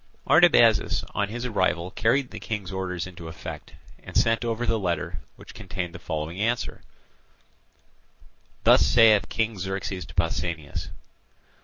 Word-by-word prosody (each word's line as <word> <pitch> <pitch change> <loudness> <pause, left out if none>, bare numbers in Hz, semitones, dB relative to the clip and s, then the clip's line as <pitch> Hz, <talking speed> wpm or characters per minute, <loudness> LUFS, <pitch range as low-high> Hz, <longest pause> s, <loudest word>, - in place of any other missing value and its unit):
Artabazus - - +5
on 100 - -1
his 120 +3 -5
arrival 95 -6 0
carried 125 +6 +1
the 110 - -7
King's 105 -4 -5
orders 95 -2 -3
into 85 -2 -10
effect, 80 0 -8 0.3
and - - -4
sent 115 +1 +2
over 120 0 -2
the 115 -1 +1
letter, 90 -4 -2 0.2
which - - -14
contained 90 -2 -5
the - - -9
following 80 +2 -4
answer: 115 +2 -1 1.8
"Thus - - +6
saith 110 -5 +5
King 110 -3 -1
Xerxes 95 0 -4
to - - -14
Pausanias. 85 -3 -2
95 Hz, 135 wpm, -25 LUFS, 90-115 Hz, 1.8 s, Thus